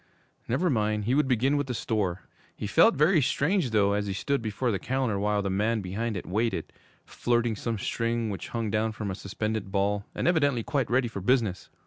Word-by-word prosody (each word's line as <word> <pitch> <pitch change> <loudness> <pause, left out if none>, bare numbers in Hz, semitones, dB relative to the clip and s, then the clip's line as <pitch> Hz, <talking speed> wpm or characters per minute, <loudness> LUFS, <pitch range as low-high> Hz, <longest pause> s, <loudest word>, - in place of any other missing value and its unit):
Never 135 +10 +1
mind, 105 -3 0
he 120 - +1
would 150 0 +3
begin 130 +3 +2
with 145 -1 -1
the 125 - -3
store. 100 -6 -1 0.3
He - - -5
felt - - +5
very 155 +3 +4
strange, 140 +5 +1
though, 100 -2 +3
as 105 0 -1
he 100 - -2
stood 140 +8 -1
before 115 +3 -1
the 100 - -1
counter, 125 -4 -1
while 105 0 +1
the 100 - -1
man 110 +3 +1
behind 105 +4 -3
it - - -6
waited, 110 +5 -1 0.3
flirting 120 -2 0
some 115 +2 -3
string 115 +2 -1
which 95 - -5
hung 115 -3 -3
down 110 +1 0
from 105 -2 -4
a - - -2
suspended 105 +1 -4
ball, 100 +1 0
and - - -1
evidently 145 -9 +2
quite 140 -4 -1
ready 120 +1 +2
for 105 -4 -6
business. 110 -4 +1
110 Hz, 205 wpm, -27 LUFS, 105-125 Hz, 0.3 s, felt